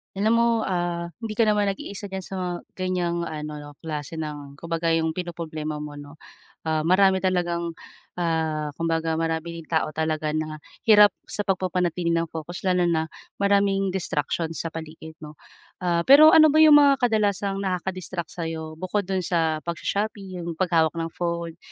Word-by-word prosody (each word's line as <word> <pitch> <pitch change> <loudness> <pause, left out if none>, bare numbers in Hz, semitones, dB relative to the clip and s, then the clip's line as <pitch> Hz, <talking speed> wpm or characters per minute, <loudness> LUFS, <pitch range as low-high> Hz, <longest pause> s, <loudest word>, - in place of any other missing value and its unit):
Alam 215 +4 +2
mo, 235 0 +4
ah, 175 -2 -2 0.2
hindi 215 - -3
ka 230 - +1
naman 210 -2 +3
nag-iisa 200 +1 -8
diyan 190 -1 -5
sa, 180 -2 -4 0.2
ganiyang 175 -2 -1
ano 150 -2 -7
klase 155 -1 -5
ng 150 -3 -6
kumbaga 165 0 0
'yung 160 0 +1
pinoproblema 160 -3 -5
mo 150 -1 -7
'no. 145 +2 -12 0.4
Ah, 160 -1 -1
marami 190 +2 +5
talagang, 175 -2 -1 0.4
ah, 160 -3 -1
kumbaga, 165 -1 0
maraming 165 0 -3
din - - -35
tao 160 -2 0
talaga 155 0 -1
na 155 -1 -3 0.2
hirap 210 -2 +8 0.2
sa - - -3
pag-papanatili 180 -3 0
ng 165 -1 0
focus 165 +2 -7
lalo 180 -2 +2
na 160 -1 0 0.3
maraming 200 -1 +2
distraction 165 -2 -2
sa 165 +1 -4
paligid 160 0 -9
mo. 150 -1 -10 0.5
Ah, 170 -1 +1
pero 300 +3 +9
ano 310 -2 +7
ba 310 - +6
'yung 305 -2 +9
mga 280 -2 +5
kadalasang 200 -2 0
nakaka-distract 185 -3 -3
sa'yo 160 -2 -5
bukod 185 +2 -2
dun 185 -2 -1
sa 160 -3 0
pag-sho-shopping, 185 0 -3
pag-hawak 165 -3 +2
ng 165 0 -3
phone, 170 -1 -3
170 Hz, 155 wpm, -24 LUFS, 160-190 Hz, 0.5 s, pero